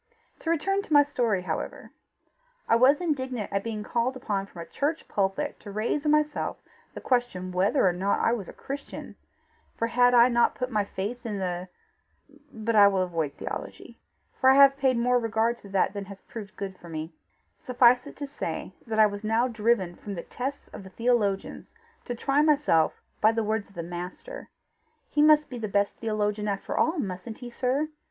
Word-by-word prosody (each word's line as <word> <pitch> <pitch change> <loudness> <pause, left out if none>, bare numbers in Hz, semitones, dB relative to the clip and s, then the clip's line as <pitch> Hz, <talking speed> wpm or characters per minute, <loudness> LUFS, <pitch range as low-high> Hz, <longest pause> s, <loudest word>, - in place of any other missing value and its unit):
To 325 - -4
return 390 +5 +1
to 325 - -5
my 290 0 +8
story, 235 -9 0
however: - - -5 0.8
I - - +4
was 260 +6 +5
indignant 260 - -2
at 200 0 0
being 220 -2 -4
called 240 +4 -1
upon 200 -6 -2
from 170 -4 -9
a - - -13
church 300 - -2
pulpit 200 +9 -1
to 205 - -10
raise 225 +8 -1
in 300 - +3
myself 300 0 +1 0.4
the - - -7
question 240 -8 0
whether 190 +6 +2
or 180 - +2
not 190 +3 0
I - - +2
was 205 -7 -4
a - - -9
Christian; 280 +1 -7 0.6
for 230 - 0
had 245 +1 +4
I 240 0 +8
not 235 -1 +2
put 255 +1 -3
my 210 -2 +1
faith 205 +5 -5
in 215 -3 -3
the? 180 -1 -3 0.8
But 225 -1 -2
I 205 -1 +8
will 195 -2 +2
avoid 165 -5 -2
theology, - - -7 0.4
for 260 - +5
I 265 - +7
have 275 0 +7
paid 265 -3 +2
more 245 +1 +3
regard 225 +1 0
to 200 - -13
that 195 0 +1
than 200 -1 -5
has 195 0 -11
proved 210 -3 -9
good 195 -2 -6
for 170 - -12
me. 160 +1 -5 0.5
Suffice 250 0 +4
it - - -11
to 285 - -5
say 280 - -5
that 220 -1 -2
I 215 - +7
was 205 0 -3
now 225 +3 +2
driven 220 -6 +1
from 200 +2 -7
the 170 - -5
tests 270 +3 -5
of - - -10
the 190 - -11
theologians 215 - -1 0.3
to 245 - -4
try 275 +4 +1
myself 295 - +3 0.2
by 220 - +6
the 225 0 -1
words 215 -1 -2
of 200 - -22
the 170 - -4
Master: 175 +2 -7 0.6
he 295 - +2
must 300 0 +6
be 245 - -7
the 220 - -3
best 200 0 +1
theologian 210 -1 -1
after 200 -1 -3
all, 320 +3 +2
mustn't 205 -2 -4
he, 245 -1 -9
sir? 265 +5 0
225 Hz, 200 wpm, -27 LUFS, 200-260 Hz, 0.8 s, my